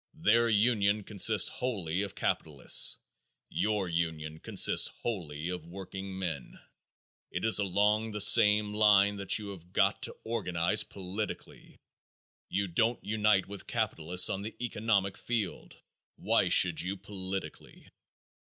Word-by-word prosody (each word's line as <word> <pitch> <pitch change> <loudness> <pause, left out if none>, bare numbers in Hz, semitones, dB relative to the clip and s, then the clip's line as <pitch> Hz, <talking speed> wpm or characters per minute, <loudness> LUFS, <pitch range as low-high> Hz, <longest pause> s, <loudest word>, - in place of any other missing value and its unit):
Their 120 -6 +2
union 105 -2 +1
consists 105 +1 +3
wholly 100 -9 -3
of 100 -1 -6
capitalists; 75 -4 +2 0.5
your 105 -3 -2
union 80 -2 -4
consists - - +4 0.2
wholly 85 -8 -5
of 90 -2 -7
workingmen. 95 -4 -7 0.7
It 90 - -4
is 110 -1 +5
along 105 +3 0
the 105 -1 -6
same 105 0 +5
line 105 -1 +3
that 100 -1 0
you 105 -2 -6
have 90 -2 -12
got - - +1
to - - -5
organize 105 -2 0
politically. 100 +2 -8 0.7
You 100 +1 -2
don't 115 +7 -1
unite 105 -2 +1
with 100 -1 -10
capitalists 90 +3 +1
on 95 - -4
the 110 +2 -8
economic 105 -5 -2
field; 110 -6 -5 0.4
why - - +1
should 85 -3 +4
you 95 +3 -4
politically? 95 -1 -8
100 Hz, 125 wpm, -29 LUFS, 90-105 Hz, 0.7 s, is